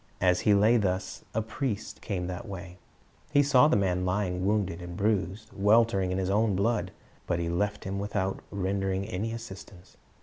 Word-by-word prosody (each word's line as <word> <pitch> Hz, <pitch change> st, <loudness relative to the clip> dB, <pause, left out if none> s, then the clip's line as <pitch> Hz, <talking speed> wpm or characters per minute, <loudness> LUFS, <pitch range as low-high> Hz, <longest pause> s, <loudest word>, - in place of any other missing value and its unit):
As 90 Hz, -1 st, +3 dB
he 105 Hz, -, +4 dB
lay 110 Hz, +4 st, +5 dB
thus, 95 Hz, -3 st, -2 dB
a 110 Hz, -, +1 dB
priest 115 Hz, -1 st, -4 dB
came 90 Hz, -4 st, -3 dB
that 90 Hz, +6 st, -5 dB
way; 90 Hz, -2 st, -8 dB, 0.5 s
he 145 Hz, 0 st, +5 dB
saw 140 Hz, 0 st, +6 dB
the -, -, +3 dB
man 90 Hz, -3 st, +1 dB
lying 90 Hz, -1 st, -1 dB
wounded 100 Hz, -5 st, 0 dB
and 85 Hz, 0 st, -7 dB
bruised, 100 Hz, -1 st, -1 dB
weltering 105 Hz, -2 st, +3 dB
in 90 Hz, -, -1 dB
his 95 Hz, -1 st, -1 dB
own 105 Hz, 0 st, +2 dB
blood; 105 Hz, +3 st, +1 dB, 0.4 s
but -, -, +1 dB
he 85 Hz, -1 st, -2 dB
left 105 Hz, +4 st, -1 dB
him 95 Hz, +1 st, -3 dB
without 100 Hz, -1 st, -2 dB
rendering 95 Hz, 0 st, -1 dB
any 110 Hz, +1 st, -3 dB
assistance. 100 Hz, -5 st, -10 dB
100 Hz, 175 wpm, -28 LUFS, 90-110 Hz, 0.5 s, saw